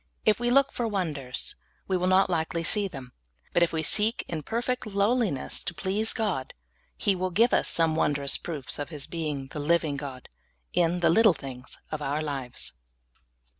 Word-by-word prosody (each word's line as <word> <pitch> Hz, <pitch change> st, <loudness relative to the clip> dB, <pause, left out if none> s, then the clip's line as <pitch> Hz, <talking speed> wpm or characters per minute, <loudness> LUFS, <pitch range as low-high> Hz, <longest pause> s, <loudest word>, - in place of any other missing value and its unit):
If 215 Hz, 0 st, +4 dB
we 240 Hz, 0 st, +1 dB
look 275 Hz, +2 st, +4 dB
for 240 Hz, -, -1 dB
wonders, 155 Hz, -, -2 dB, 0.3 s
w^e 185 Hz, -1 st, +1 dB
will 180 Hz, -, +1 dB
not 185 Hz, +1 st, +5 dB
likely 165 Hz, -1 st, -1 dB
see 205 Hz, +4 st, +1 dB
them, 135 Hz, -8 st, -9 dB, 0.4 s
but 175 Hz, -, +3 dB
if 170 Hz, -, +4 dB
we 160 Hz, -1 st, -1 dB
seek 215 Hz, +8 st, +2 dB
in 160 Hz, -2 st, -3 dB
perfect 240 Hz, -, -2 dB
lowliness 200 Hz, -, 0 dB
to 175 Hz, -, -4 dB
please 205 Hz, +6 st, +2 dB
God, 195 Hz, -12 st, -1 dB, 0.4 s
He 200 Hz, -, +2 dB
will 185 Hz, 0 st, -1 dB
give 225 Hz, +7 st, +3 dB
us -, -, +3 dB
some 165 Hz, -1 st, +2 dB
wondrous 140 Hz, -3 st, +1 dB
proofs 150 Hz, -6 st, -3 dB
of 145 Hz, -, -3 dB
His 150 Hz, -4 st, -4 dB
being 150 Hz, -5 st, -4 dB
the 150 Hz, -, -5 dB
living 155 Hz, -1 st, +1 dB
God 135 Hz, -3 st, -7 dB, 0.5 s
in 175 Hz, +1 st, +2 dB
the 170 Hz, -, +5 dB
little 215 Hz, -1 st, +6 dB
things 130 Hz, -2 st, -7 dB
of 155 Hz, -1 st, -3 dB
our 145 Hz, +2 st, -1 dB
lives. 135 Hz, -, -4 dB
170 Hz, 180 wpm, -27 LUFS, 145-205 Hz, 0.5 s, little